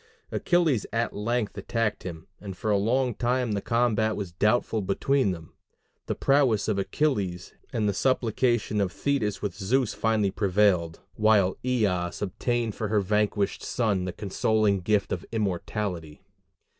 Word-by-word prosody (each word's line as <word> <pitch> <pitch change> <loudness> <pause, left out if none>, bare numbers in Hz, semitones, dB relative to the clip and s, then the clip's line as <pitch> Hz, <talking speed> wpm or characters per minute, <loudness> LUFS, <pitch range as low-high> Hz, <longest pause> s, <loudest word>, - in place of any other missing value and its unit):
Achilles 165 - +1
at 115 +1 -1
length 110 0 -1
attacked 115 +1 -1
him, 85 -3 -7
and 95 -3 -8
for 110 - -1
a - - +4
long 125 +5 +1
time 125 +1 0
the 100 -1 -1
combat 115 -2 +1
was 100 -4 -5
doubtful 105 +4 +1
between 125 +6 +1
them: 80 -3 -6 0.5
the - - -1
prowess 135 -7 +2
of 105 -3 0
Achilles 100 - -1 0.2
and 110 -2 0
the 100 - +1
supplication 120 -2 +1
of 95 -2 0
Thetis 120 -8 -1
with 100 -4 -2
Zeus 110 +4 0
finally 110 -3 +1
prevailed; 95 -5 +1
while 105 -4 +3
Eos 100 -9 0
obtained 115 +3 -1
for 110 - -3
her 105 0 +2
vanquished 105 0 0
son 105 -6 0
the 90 - -2
consoling 105 +2 +1
gift 100 +2 0
of 90 - -2
immortality. 95 -6 -3
105 Hz, 145 wpm, -26 LUFS, 95-120 Hz, 0.5 s, a